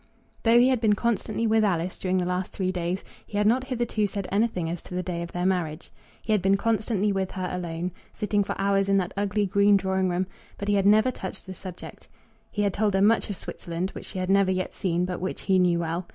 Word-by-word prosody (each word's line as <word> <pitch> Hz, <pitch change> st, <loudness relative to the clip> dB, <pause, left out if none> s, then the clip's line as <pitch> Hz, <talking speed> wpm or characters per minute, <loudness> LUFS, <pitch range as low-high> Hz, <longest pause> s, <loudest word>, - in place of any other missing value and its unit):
Though 230 Hz, +1 st, +5 dB
he 250 Hz, +2 st, +5 dB
had 255 Hz, -3 st, +1 dB
been 215 Hz, -3 st, +4 dB
constantly 230 Hz, 0 st, -1 dB
with 220 Hz, 0 st, +3 dB
Alice 180 Hz, -3 st, 0 dB
during 185 Hz, 0 st, 0 dB
the 180 Hz, -, +1 dB
last 180 Hz, +1 st, -2 dB
three 185 Hz, -1 st, -1 dB
days, 180 Hz, +1 st, -2 dB, 0.2 s
he 205 Hz, -, -4 dB
had 210 Hz, -, +2 dB
not 250 Hz, +4 st, +3 dB
hitherto 240 Hz, -5 st, 0 dB
said 200 Hz, -1 st, -4 dB
anything 200 Hz, -4 st, +1 dB
as 170 Hz, +1 st, -4 dB
to 180 Hz, -, -9 dB
the 180 Hz, -, -1 dB
day 175 Hz, -2 st, -3 dB
of 170 Hz, -, -6 dB
their 175 Hz, 0 st, -2 dB
marriage. 175 Hz, -4 st, -1 dB, 0.3 s
He 220 Hz, -, -2 dB
had 210 Hz, -3 st, +3 dB
been 195 Hz, +1 st, +3 dB
constantly 215 Hz, -1 st, +1 dB
with 190 Hz, -1 st, -1 dB
her 185 Hz, -1 st, -3 dB
alone, 175 Hz, 0 st, -3 dB, 0.2 s
sitting 210 Hz, -1 st, 0 dB
for -, -, -4 dB
hours 195 Hz, 0 st, +2 dB
in 195 Hz, -, +4 dB
that 185 Hz, 0 st, -1 dB
ugly 205 Hz, +1 st, 0 dB
green 200 Hz, +1 st, +4 dB
drawing 190 Hz, -1 st, 0 dB
room, 180 Hz, +1 st, 0 dB, 0.3 s
but 200 Hz, -, -3 dB
he -, -, +3 dB
had 200 Hz, -1 st, +3 dB
never 215 Hz, +5 st, +5 dB
touched 190 Hz, -6 st, -7 dB
the 190 Hz, -, -7 dB
subject. 185 Hz, -1 st, -10 dB, 0.4 s
He 205 Hz, -, -1 dB
had 200 Hz, -2 st, +1 dB
told 205 Hz, 0 st, +1 dB
her 195 Hz, -, +3 dB
much 220 Hz, +1 st, +3 dB
of 200 Hz, -, -4 dB
Switzerland, 170 Hz, +3 st, -4 dB
which -, -, -8 dB
she 195 Hz, -, -5 dB
had 185 Hz, 0 st, -1 dB
never 195 Hz, -1 st, +4 dB
yet 185 Hz, 0 st, -1 dB
seen 175 Hz, -1 st, 0 dB
but 180 Hz, -1 st, -4 dB
which 185 Hz, -, -3 dB
he 190 Hz, -1 st, +3 dB
knew 175 Hz, -2 st, +3 dB
well. 170 Hz, +1 st, -2 dB
195 Hz, 245 wpm, -26 LUFS, 180-210 Hz, 0.4 s, Though